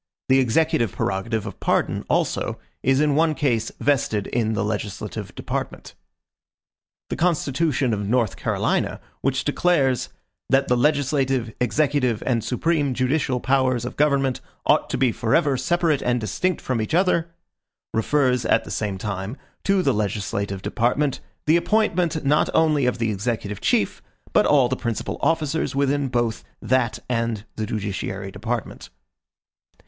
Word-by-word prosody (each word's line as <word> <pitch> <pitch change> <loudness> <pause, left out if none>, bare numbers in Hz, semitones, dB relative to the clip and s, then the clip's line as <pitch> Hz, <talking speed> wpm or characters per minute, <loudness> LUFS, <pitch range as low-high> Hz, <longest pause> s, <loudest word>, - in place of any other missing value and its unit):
The 130 0 +6
executive 120 - +2
prerogative 105 +3 -2
of 105 - -7
pardon, - - 0
also, - - 0 0.2
is 135 +1 +3
in 150 -1 +3
one 155 +1 +2
case 120 -8 0
vested 115 -7 +1
in 110 -2 0
the 105 - 0
legislative 105 -2 -4
department. - - -5 1.2
The - - 0
constitution 150 -6 +1
of 105 -1 -2
North 120 -3 +1
Carolina, - - -1 0.2
which 135 0 0
declares 145 -4 +1 0.4
"that 135 0 +3
the 125 - +3
legislative, 135 -3 +1
executive, 130 -2 +1
and 120 -4 +1
supreme 145 0 0
judicial 130 0 +1
powers 130 -2 +1
of 125 - -5
government 140 -3 +2 0.2
ought - - +3
to - - -1
be 130 -3 +3
forever 130 +6 +2
separate 155 +3 +1
and 125 0 +1
distinct 155 - -1
from 125 -3 -1
each 110 +9 -1
other," 170 -2 +2 0.6
refers, 125 +1 +2
at - - +2
the - - -9
same 100 -3 -2
time, 100 +4 -4 0.3
to 195 -1 +3
the 135 - +3
legislative 100 -2 -2
department, 125 +4 0 0.3
the 155 +2 +5
appointment 175 -6 +1
not 150 +2 +3
only 150 -5 +3
of 125 - 0
the 115 -2 0
executive 105 -1 -3
chief, - - +1 0.3
but - - +4
all 140 -4 +5
the 130 - -1
principal 120 -3 -3
officers 160 -3 0
within 140 0 +1
both 120 -3 -1 0.2
that 130 -2 +1
and 115 -3 -1
the 110 -1 -3
judiciary 100 -2 -4
department. 115 +4 -4
130 Hz, 145 wpm, -23 LUFS, 110-145 Hz, 1.2 s, The